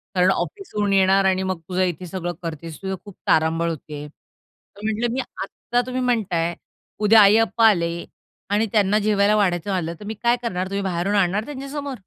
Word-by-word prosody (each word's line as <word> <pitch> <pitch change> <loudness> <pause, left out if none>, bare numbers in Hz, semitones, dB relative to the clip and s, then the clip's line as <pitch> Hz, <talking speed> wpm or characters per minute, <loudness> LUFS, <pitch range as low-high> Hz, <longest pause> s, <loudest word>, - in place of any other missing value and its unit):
कारण 180 +1 +4
ऑफिसहून 210 - -2
येणार 195 0 +4
आणि 190 0 +2
मग 185 -2 -2
तुझं 185 +1 0
इथे 180 0 -2
सगळं 175 0 -4
करतेस. 165 -1 -6
तुझं 190 0 -3
खूप 205 - -11
तारांबळ 160 +1 +2
होते." 150 -1 -6
तर 200 +6 -23
म्हंटलं, 225 +2 -1
"मी 265 - -1 0.2
आता 240 +4 -2
तुम्ही 255 0 -2
म्हणताय. 190 -9 0 0.4
उद्या 215 +1 +6
आई-अप्पा 225 +2 +5
आले 170 -3 -1 0.4
आणि 210 +2 +2
त्यांना 210 -1 +3
जेवायला 210 0 +3
वाढायचं 190 -2 +1
आलं 170 -3 -1
तर 205 - -10
मी 220 - -4
काय 235 +1 +4
करणार? 185 -4 -2
तुम्ही 200 0 -2
बाहेरून 190 +2 -1
आणणार 200 +2 +1
त्यांच्या 275 -1 -7
समोर?" 285 -1 -4
195 Hz, 180 wpm, -22 LUFS, 175-220 Hz, 0.4 s, उद्या